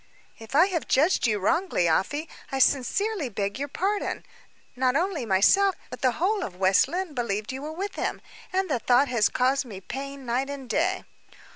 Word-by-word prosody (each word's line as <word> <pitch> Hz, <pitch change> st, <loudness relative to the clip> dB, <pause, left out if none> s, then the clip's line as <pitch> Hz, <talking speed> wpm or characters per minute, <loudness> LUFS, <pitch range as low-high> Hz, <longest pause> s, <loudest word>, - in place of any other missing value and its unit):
"If 225 Hz, +4 st, -8 dB
I 320 Hz, +5 st, +7 dB
have 365 Hz, -5 st, -3 dB
judged 295 Hz, -1 st, +3 dB
you 215 Hz, -2 st, +1 dB
wrongly, 270 Hz, -, +1 dB
Afy, 290 Hz, -, 0 dB, 0.2 s
I 270 Hz, -, -1 dB
sincerely 290 Hz, -, +1 dB
beg 200 Hz, +2 st, -3 dB
your 285 Hz, -, -2 dB
pardon. 395 Hz, +8 st, -2 dB, 0.5 s
Not 255 Hz, 0 st, +1 dB
only 330 Hz, -, -1 dB
myself, 370 Hz, -, +4 dB, 0.2 s
but -, -, -8 dB
the 255 Hz, -2 st, +3 dB
whole 395 Hz, -, 0 dB
of 180 Hz, -, -6 dB
West 190 Hz, +4 st, +4 dB
Lynne, 355 Hz, +2 st, -3 dB
believed 215 Hz, -4 st, -2 dB
you 265 Hz, +1 st, -6 dB
were 300 Hz, +2 st, -5 dB
with 390 Hz, +5 st, -4 dB
him; -, -, -3 dB, 0.3 s
and 380 Hz, +1 st, 0 dB
the 265 Hz, -7 st, 0 dB
thought 250 Hz, +4 st, +3 dB
has 235 Hz, -4 st, +2 dB
caused 260 Hz, +2 st, +1 dB
me 215 Hz, -7 st, -9 dB
pain 275 Hz, +6 st, -7 dB
night 250 Hz, +3 st, -1 dB
and 280 Hz, -2 st, -6 dB
day." 370 Hz, +8 st, 0 dB
275 Hz, 185 wpm, -26 LUFS, 235-345 Hz, 0.5 s, I